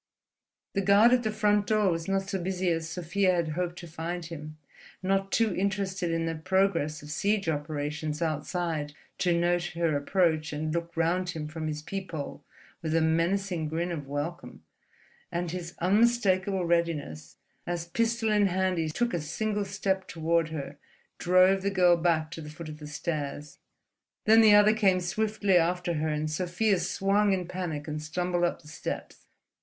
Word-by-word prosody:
The 195 - +1
guard 200 +5 +6
at 250 - +4
the 220 - -1
front 210 -1 +2
door 210 -3 +3
was 165 -1 -3
not 195 0 0
so 195 -2 -2
busy 185 0 0
as 165 0 -2
Sofia 180 +2 +1
had 170 -2 0
hoped 175 +2 -3
to 175 - -8
find 165 +2 -5
him, 155 -2 -8 0.5
not 195 +1 0
too 225 -4 +2
interested 190 -2 -1
in 165 0 0
the 165 - -1
progress 165 -3 0
of 150 - -8
siege 200 +4 0
operations 150 0 -2
outside 160 -1 -2 0.3
to 180 - +2
note 175 +1 +2
her 165 -3 +1
approach 160 0 +1
and 155 +1 -2
look 170 0 -4
round 175 +2 +1 0.2
from 155 0 -4
his 150 -1 -4
peephole 165 -6 -6 0.4
with 160 -1 -1
a 165 - +3
menacing 165 +1 +1
grin 170 +3 -2
of 145 -5 -5
welcome; 145 - -5 0.7
and 175 -1 -2
his 175 -1 -6
unmistakable 195 -2 +2
readiness, 155 - -1 0.3
as 175 -1 -2
pistol 230 +4 0
in 205 -1 +4
hand 185 -1 0
he 160 -1 0
took 240 +9 -1
a 170 - -1
single 205 +7 -2
step 190 -1 -1
toward 165 0 0
her, 145 -2 -6 0.4
drove 185 +2 +4
the 200 - 0
girl 180 -3 +5
back 165 -2 +1
to 165 - -7
the 150 - -8
foot 155 +1 -8
of 150 0 -9
the 150 - -8
stairs. 150 -1 -4 0.7
Then 220 +1 +7
the 215 -2 +7
other 210 +1 +6
came 195 -4 +3
swiftly 200 +1 +1
after 175 +1 +1
her, 155 0 -1
and 155 0 -1
Sofia 180 +5 0
swung 195 +3 +2
in 180 -2 -2
panic 170 -5 -4
and 150 0 -4
stumbled 175 +3 -1
up 170 - -3
the - - -16
steps. 155 - -6
175 Hz, 170 wpm, -28 LUFS, 160-195 Hz, 0.7 s, Then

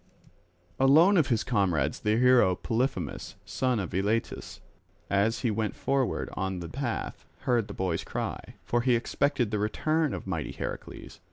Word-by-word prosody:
Alone 155 +9 +6
of 160 -7 +4
his 115 -3 +1
comrades 90 - +1
the 105 0 +1
hero 120 -7 +5
Polyphemus, 120 +8 -2
son 130 -3 0
of 95 - -4
Eilatus, 105 +5 -2 0.5
as 100 +3 +2
he 120 - +1
went 110 0 -2
forward 135 -2 0
on 95 -1 -2
the 85 - -6
path, 125 -3 -4 0.2
heard 120 -4 +1
the - - -7
boy's 90 -3 -1
cry, - - -5
for 120 - +1
he 125 0 +3
expected 120 0 0
the 105 - 0
return 155 +8 0
of - - -7
mighty 85 -5 -3
Heracles. 80 - -7
115 Hz, 155 wpm, -28 LUFS, 100-130 Hz, 0.5 s, Alone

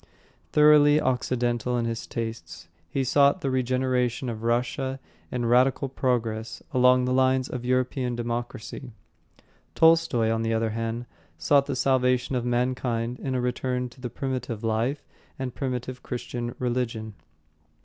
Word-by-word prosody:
Thoroughly 150 0 +6
Occidental 125 -2 0
in 120 - 0
his 115 -1 -4
tastes, 90 -8 -6 0.2
he 135 - -1
sought 140 +2 +3
the 135 - -1
regeneration 130 -1 0
of 110 -2 -5
Russia 125 +3 -1 0.3
in 120 -1 -2
radical 125 +3 +3
progress 115 -4 -2
along 125 0 +5
the 125 - 0
lines 130 0 +2
of 125 -1 -5
European 125 0 0
democracy. 120 +1 -5 0.8
Tolstoy, 160 -9 +4
on 115 0 0
the 115 0 0
other 110 0 0
hand, 115 +2 -3 0.3
sought 140 - +3
the - - -2
salvation 125 0 +1
of 125 - 0
mankind 120 -1 -1
in 130 -2 -3
a 125 - 0
return 125 0 -2
to 125 +2 -18
the 125 - -4
primitive 125 -3 -4
life 115 +6 -1 0.3
and 130 -2 -4
primitive 125 -1 -4
Christian 120 -1 -5
religion. 120 -3 -2
125 Hz, 140 wpm, -26 LUFS, 115-130 Hz, 0.8 s, Thoroughly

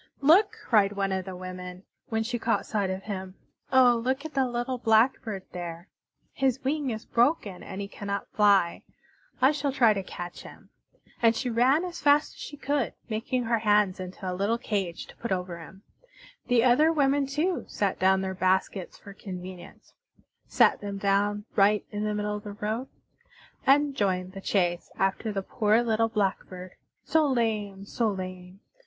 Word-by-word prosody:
"Look!" 395 +10 +5
cried 205 -3 +4
one 195 -1 -1
of 190 -1 -2
the 190 -1 -6
women, 180 0 -8 0.3
when 225 -1 0
she 240 +1 -3
caught 225 0 0
sight 205 -3 -1
of 190 +1 -4
him. 190 -3 -6 0.4
"Oh, 250 -3 +5
look 265 +4 -1
at 315 - -6
the 270 -2 +2
little 245 +1 -3
Blackbird 220 -3 +2
there! 175 0 -7 0.4
His 265 -2 0
wing 285 0 -1
is 220 -2 -5
broken 235 - +1
and 190 - -7
he 200 - -4
cannot 200 0 -5
fly. 200 -5 +3 0.6
I 265 - +7
shall 290 -2 -1
try 240 -5 +4
to 200 - -2
catch 175 -1 -8
him." - - -14 0.5
And 230 -1 +4
she 245 +2 -2
ran 260 +9 +3
as 355 -1 -7
fast 290 +1 +3
as - - -18
she 290 - -8
could, 285 -3 -1
making 240 +3 -1
her 230 0 +1
hands 210 -3 +2
into 185 0 -8
a 180 - -1
little 200 +5 0
cage 195 -7 -3
to - - -15
put 235 - -5
over 180 -2 -2
him. 190 +4 -13 0.6
The 240 -2 +4
other 260 +6 +5
women, 280 -2 +2
too, 315 +6 -1
set 200 -2 -1
down 190 +1 +4
their 190 0 -3
baskets, 185 0 0
for 200 - -12
convenience 185 -2 -10 0.5
set - - +3
them 200 -1 -5
down 205 +1 +1
right 205 +1 +4
in 210 0 -3
the 210 0 -1
middle 210 0 -2
of 205 - -10
the 205 -2 -7
road 220 +5 -3 0.8
and 285 +1 +4
joined 185 -5 0
the 195 0 -9
chase 175 -3 0
after 195 +3 0
the 195 -2 -3
poor 220 +2 +2
little 225 -1 +1
Blackbird, 190 -3 -2 0.3
so 315 -2 +2
lame, 215 -6 -1
so 225 +2 0
lame! 185 -1 -7
210 Hz, 175 wpm, -27 LUFS, 190-250 Hz, 0.8 s, I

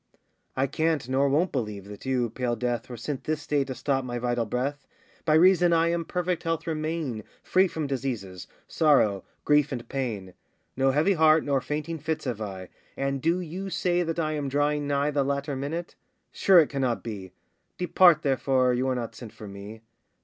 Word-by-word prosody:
I 135 - +3
can't 155 -1 0
nor 135 +2 +2
won't 160 +7 +2
believe 105 -7 -3
that 105 +5 -10
you, 125 -3 0
pale 125 -2 -1
Death, 120 0 -2
Were 120 - -7
sent 135 +4 -5
this 155 -1 -2
day 145 -2 +1
to 130 -1 -5
stop 135 +2 0
my 120 -1 -4
vital 120 -1 -1
breath, 140 +5 -3 0.4
By 155 -1 +4
reason 175 +1 +5
I 165 0 +3
in 170 -1 -1
perfect 180 0 -2
health 165 0 -2
remain, 155 -7 -3 0.2
Free 190 +1 +3
from 160 -3 -4
diseases, 120 -10 -4 0.2
sorrow, 120 - +3 0.2
grief, 150 -1 +3
and 120 -3 -5
pain; 110 -9 -4 0.4
No 135 +1 +2
heavy 150 +9 +3
heart, 160 -2 +5
nor 140 -2 +1
fainting 155 +3 -4
fits 155 +1 -3
have 120 -4 -3
I, 95 -3 -6 0.3
And 135 0 -1
do 170 +4 +1
you 180 +3 -5
say 180 -1 +1
that 165 -1 -2
I 155 -2 0
am 145 -2 -2
drawing 145 +1 0
nigh 145 +1 +1
The 140 -1 +1
latter 140 +1 -2
minute? 155 +6 -4 0.4
sure 190 -2 +4
it 155 - +4
cannot 130 -4 -1
be; 100 -5 -7 0.5
Depart, 180 -3 +5
therefore, 130 -2 +2
you 125 +2 0
are 130 - +1
not 120 -2 -4
sent 115 -4 -10
for 105 - -10
me! 100 +3 -9
140 Hz, 190 wpm, -26 LUFS, 125-160 Hz, 0.5 s, reason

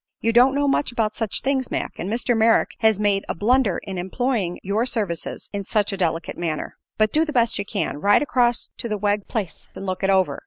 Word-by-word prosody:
You 230 +1 0
don't 255 +3 +5
know 285 0 +1
much 275 -1 +1
about 220 -3 0
such 220 -3 -1
things, 265 -2 0
Mac, - - -4
and 180 - -3
Mr. 240 +2 0
Merrick 225 0 +3
has 220 -3 +3
made 205 -2 +1
a - - -1
blunder 225 +1 +2
in 190 -2 -5
employing 195 -1 -1
your 205 +4 0
services 205 -10 -3
in 200 -1 -3
such 205 +1 0
a - - -3
delicate 165 -2 -2
matter. 160 -3 -3 0.2
But 215 -1 +2
do 310 - +4
the 315 - -3
best 235 -6 +1
you 200 - -2
can. 200 -7 -2
Ride 205 - +4
across 245 -3 +1
to 235 - -3
the 210 - -1
Wegg 205 0 0
place 200 -8 -4
and 195 - -7
look 185 0 -3
it 195 - +2
over. 185 -7 +2
210 Hz, 230 wpm, -23 LUFS, 195-240 Hz, 0.2 s, don't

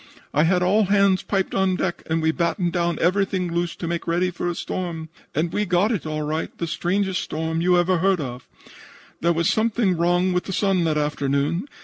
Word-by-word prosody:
I 150 +3 +3
had 180 +1 +2
all 205 +4 +3
hands 200 -1 +3
piped 195 -2 -1
on 190 -1 +2
deck 180 -1 -2
and 160 0 0
we 160 - +3
battened 170 +1 -1
down 170 -2 0
everything 185 -1 +1
loose 170 0 -1
to 170 - -5
make 170 0 -3
ready 175 +2 +1
for 175 0 -4
a 175 - -3
storm. 165 -4 -4 0.3
And 165 +3 0
we 210 - +1
got 185 +3 +2
it 195 -8 -2
all 155 0 -2
right 155 +2 -2
the 170 - -2
strangest 185 +3 -1
storm 160 +1 -2
you 180 +1 +4
ever 175 0 +2
heard 190 +2 +3
tell 145 -5 -3
of. 125 - -21 0.7
"There 170 - +2
was 170 0 +1
something 220 -3 +1
wrong 175 +2 +2
with 180 - -1
the 190 - -4
sun 190 -3 +1
that 155 -2 +1
afternoon. 150 - 0
175 Hz, 215 wpm, -23 LUFS, 165-190 Hz, 0.7 s, you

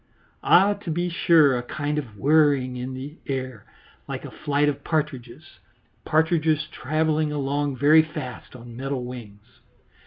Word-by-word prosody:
Ah! 195 +3 +5
to 200 -3 -9
be 175 +2 -1
sure, 160 -5 +4
a 120 - -1
kind 145 +4 -3
of 115 -8 -9
whirring 140 -2 +3
in 125 +1 -5
the 140 +5 -8
air 130 -5 -4 0.4
like - - -5
the - - -8
flight 145 0 0
of 145 -1 -2
partridges 140 -7 -4 0.5
partridges 155 -1 +2
travelling 155 +2 0
along 145 -1 -1
very 150 +4 +6
fast 150 -6 -8
on 120 -1 -11
metal 135 0 -4
wings. 120 -3 -11
145 Hz, 145 wpm, -24 LUFS, 130-155 Hz, 0.5 s, very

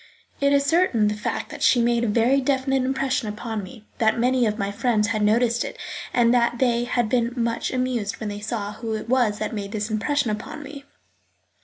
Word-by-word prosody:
It 280 0 +3
is 280 0 +3
certainly 305 -9 +3
the 210 - +1
fact - - -3
that - - -8
she 245 - +4
made 235 0 +2
a - - +1
very 235 +6 +3
definite 270 0 +1
impression 260 -2 -1
upon 215 +1 -4
me, 200 +3 -11
that 220 0 +3
many 250 0 +2
of 210 0 -2
my 200 0 -2
friends 215 -1 +1
had 215 -1 -1
noticed 235 +3 +2
it - - -7 0.3
and 235 -1 +3
that 240 0 +2
they 240 -1 +1
had 240 -1 0
been 235 +1 0
much 235 -1 -1
amused 250 -5 -1
when 215 - -4
they 205 0 -5
saw 210 -1 -3
who 225 0 -4
it 215 - -6
was 240 -4 +2
that 215 +2 -3
made 200 -1 -5
this 215 0 -3
impression 245 +3 0
upon 215 +8 -6
me. 285 0 -10
235 Hz, 210 wpm, -23 LUFS, 215-255 Hz, 0.3 s, she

